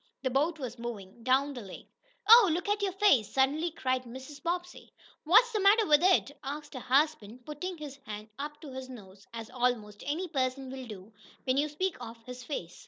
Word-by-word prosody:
The 260 - 0
boat 305 +6 +1
was 250 -4 -6
moving 230 -3 -7
down 270 +3 +2
the 245 - -7
lake. 195 -3 -11 0.4
"Oh, 455 -3 +9
look 345 +5 -2
at 415 0 +1
your 395 -1 0
face!" 370 - +3
suddenly 285 +6 +2
cried 260 -5 -1
Mrs. 265 +4 -10
Bobbsey. 350 +2 -4 0.3
"What's 455 +9 +6
the 430 - 0
matter 410 +3 +5
with 300 -3 +5
it?" 365 -5 +4
asked 290 +3 -6
her 260 - -5
husband, 255 -4 0
putting 335 +5 -5
his 290 -3 -8
hand 215 +1 -7
up 295 +1 -5
to 295 -4 -9
his 260 0 -7
nose, 200 -5 -13
as 230 0 -8
almost 240 -5 -1
any 330 +6 -1
person 265 -3 -2
will 260 -1 -7
do 210 0 -10 0.3
when 260 0 +1
you 300 +2 +2
speak 370 +5 -2
of 230 +1 -8
his 250 0 -8
face. 180 - -6
270 Hz, 200 wpm, -30 LUFS, 245-325 Hz, 0.4 s, Oh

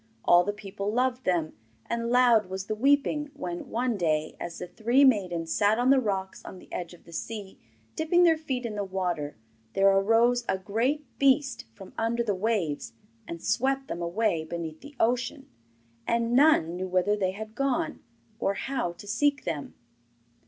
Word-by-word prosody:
All 175 0 +6
the 205 - -1
people 205 -1 -5
loved 250 +2 0
them, 170 -4 0 0.3
and 235 0 -2
loud 240 -4 +5
was 190 +1 -5
the 215 - -2
weeping 285 +5 +2
when 175 -1 -5
one 240 -1 -1
day, 155 -3 0
as 170 -1 -6
the - - -5
three 235 +9 +3
maidens 180 -9 +1
sat 210 +1 +3
on 245 +2 +3
the 275 - +6
rocks 195 -5 -3
on - - -9
the - - -15
edge 175 0 -5
of - - -22
the 170 - -15
sea, 205 +1 -6 0.4
dipping 345 +3 +3
their 335 -2 +6
feet 260 -6 -3
in 225 - -3
the 205 -1 -2
water, 180 - -3 0.4
there 195 0 +5
arose 225 +5 +3
a 190 - +2
great 230 +10 -1
beast 275 0 +2
from 190 - -12
under 235 +1 0
the 210 -3 0
waves 190 - -1 0.3
and 170 -1 -7
swept 270 +5 0
them 170 - -4
away 170 -1 0
beneath 160 -1 -6
the 285 +1 -12
ocean. 245 +4 0 0.6
And 235 0 +1
none 255 - +4
knew 185 +1 -3
whither 185 +3 +2
they 190 -2 -1
had 215 +2 -8
gone, 275 0 -1 0.4
or 200 - 0
how 260 -8 -2
to 205 - -13
seek 285 +7 +1
them. 155 -5 -4
215 Hz, 180 wpm, -27 LUFS, 185-250 Hz, 0.6 s, All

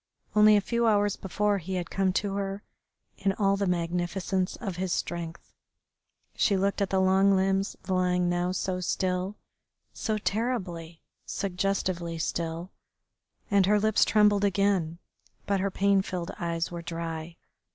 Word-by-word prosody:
Only 210 0 +7
a - - +2
few 235 +3 0
hours 205 -2 +3
before 205 +1 0
he 190 +2 -5
had 175 -2 -4
come 195 -1 +1
to 200 0 -1
her 195 0 -3 0.6
in 195 - +1
all 195 0 +2
the 200 0 -1
magnificence 180 +2 -1
of 195 -7 -5
his 185 0 -2
strength. 170 -1 -4 0.8
She 200 - +2
looked 200 +1 0
at 195 - +1
the 190 - +1
long 190 +1 +4
limbs 195 +1 +1
lying 180 -1 +1
now 175 +1 0
so 185 0 -2
still, 185 +2 -1 0.6
so 220 -1 -2
terribly, 195 -7 -3 0.2
suggestively 180 -3 -2
still, 165 +2 -3 0.8
and 200 -2 +4
her 210 +1 +4
lips 215 0 +3
trembled 210 -2 +4
again, 195 -4 +1 0.5
but 200 -1 +1
her 200 +1 0
pain 195 0 +3
filled 180 -1 -4
eyes 170 -1 -2
were 170 -1 -5
dry. 165 -1 -5
190 Hz, 145 wpm, -28 LUFS, 175-200 Hz, 0.8 s, Only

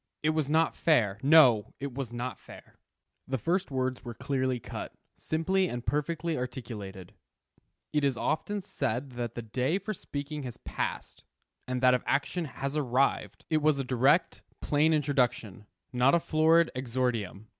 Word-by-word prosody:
It 155 - +3
was 155 -3 -1
not 160 +2 +2
fair; 110 -11 +2
no, 135 -7 +5
it 140 -2 -5
was 130 -3 -4
not 120 +2 -4
fair. - - -15 0.5
The 130 - -1
first 175 - 0
words 130 -2 -2
were 120 -2 -7
clearly 130 -1 -1
cut, - - -7 0.2
simply 185 +4 0
and 120 0 -5
perfectly 155 +3 -1
articulated. 115 - -6 0.8
"It 150 -1 +1
is 135 -3 +1
often 200 +6 -1
said 135 - -3
that 120 -2 -5
the 120 - -5
day 130 - 0
for 205 +2 -4
speaking 145 -4 -6
has 125 -3 -7
passed, - - -5 0.4
and 125 0 -2
that 130 -1 +6
of 125 - +2
action 160 +5 0
has 140 0 -5
arrived." 135 -2 0
It 155 -1 +3
was 150 -1 +3
a 135 - -1
direct, 135 +6 +2 0.2
plain 150 +2 +2
introduction; 125 -9 0 0.3
not 125 +5 +4
a - - +4
florid 160 +1 +3
exordium. 120 -5 -2
135 Hz, 155 wpm, -29 LUFS, 125-155 Hz, 0.8 s, that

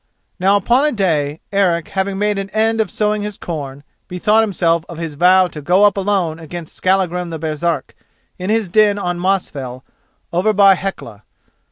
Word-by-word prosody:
Now 195 +2 +3
upon 240 +7 +2
a 300 - +2
day, 160 - -1
Eric 175 -5 +1
having 195 0 -2
made 205 0 0
an 195 0 -5
end 225 +1 +2
of 215 - -2
sowing 210 +1 -1
his 210 -1 -5
corn, 145 -4 -6 0.2
bethought 210 +5 +2
himself 170 -6 +1
of 170 - -8
his 165 -2 -5
vow 180 +4 +5
to 150 - -9
go 180 +7 +3
up 205 -2 +5
alone 190 -5 -1
against 165 0 -8
Skallagrim 180 -2 0
the 165 - -5
Baresark 155 -1 -3 0.4
in 185 +2 -4
his 220 -2 +1
den 205 +2 +3
on 175 -3 -3
Mosfell 140 -9 -2 0.5
over 190 +5 +2
by 200 -1 +6
Hecla. 180 - -6
185 Hz, 175 wpm, -18 LUFS, 165-205 Hz, 0.5 s, by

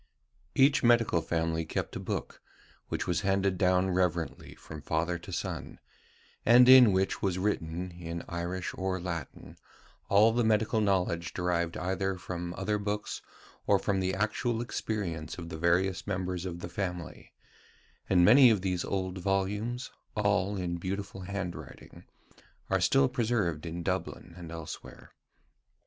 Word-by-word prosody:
Each 140 +1 +5
medical 115 -8 +4
family 80 0 -1
kept - - -4
a - - -3
book, - - -5 0.5
which - - -3
was 85 -2 0
handed 95 -1 +1
down 95 0 +3
reverently 90 -3 -1
from 75 -1 -10
father 80 +4 -1
to - - -10
son, - - -4 0.7
and 120 +2 +7
in 130 -4 +9
which 95 +1 0
was 95 -2 0
written, 90 -2 -2
in 85 -1 -6
Irish 85 +2 -4
or 95 0 -2
Latin, 85 -4 -6 0.5
all 105 +3 +6
the 120 +1 +2
medical 110 0 +2
knowledge 90 -3 0
derived 85 -2 -1
either 95 +1 -1
from 90 -1 -5
other 105 +2 -1
books 105 0 -3 0.5
or - - +5
from 100 -1 0
the 95 0 0
actual 110 +4 -1
experience 100 -9 -3
of 85 -2 -7
the 80 - -6
various 90 +3 +1
members 90 -1 -2
of 85 -1 -6
the 85 - -6
family; 90 -1 -5 0.8
and 90 -2 +5
many 125 +5 +8
of 105 -4 +2
these 90 -2 -1
old 95 -1 -3
volumes, 100 +6 -1 0.2
all 105 -1 +1
in 90 -2 -2
beautiful 95 +2 -5
handwriting, 95 -1 -7 0.7
are - - +2
still 70 0 +4
preserved 105 - -1
in 85 +1 -5
Dublin 85 - -3
and 85 -2 -9
elsewhere. 80 -2 -9
95 Hz, 145 wpm, -30 LUFS, 85-105 Hz, 0.8 s, in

